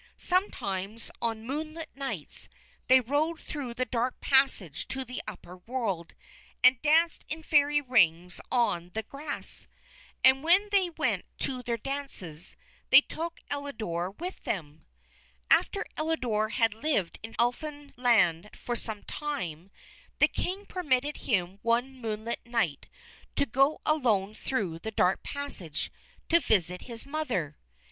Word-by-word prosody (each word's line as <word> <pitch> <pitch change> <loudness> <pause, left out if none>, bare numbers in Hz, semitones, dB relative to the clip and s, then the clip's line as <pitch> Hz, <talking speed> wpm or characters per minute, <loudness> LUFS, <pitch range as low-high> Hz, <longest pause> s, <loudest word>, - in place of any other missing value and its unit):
Sometimes 220 - 0
on 225 -1 -2
moonlit 310 +4 -4
nights 275 -1 -4 0.4
they 260 0 +8
rode 295 +6 0
through 260 -6 -6
the 255 - 0
dark 245 +1 -1
passage 265 - +3
to 265 0 -4
the 250 +1 -5
upper 180 +1 -8
world, 195 -5 -3 0.5
and 255 -1 +7
danced 320 +2 +3
in 320 +1 -4
Fairy 295 -1 +4
Rings 180 - +3
on 180 -8 +1
the 220 - -1
grass. 285 +6 -5 0.6
And 265 +1 +6
when 375 +6 +5
they 385 -3 +3
went 335 - -1 0.2
to 255 -2 +1
their 235 -1 -2
dances, 230 - -4 0.3
they 270 +2 +10
took 335 +3 -6
Elidore 220 -12 -3
with 345 - -7
them. 155 -5 -4 0.6
After 400 - +3
Elidore 250 -9 0
had 225 -1 +2
lived 220 - -1
in 225 +1 -8
Elfinland 240 - +1
for 240 - -3
some 220 -3 -2
time, 195 - -4 0.5
the - - +6
King 385 +3 -3
permitted 295 -6 0
him 190 -3 -1
one 235 +3 +1
moonlit 225 -2 -3
night 230 - -1 0.5
to 285 - +2
go 275 +5 +3
alone 220 -10 +2
through 200 -9 -2
the 220 - -4
dark 190 -3 +2
passage 195 - -3 0.4
to 335 - +5
visit 180 - +2
his 230 -1 -4
mother. 255 - -2
245 Hz, 130 wpm, -29 LUFS, 205-290 Hz, 0.6 s, they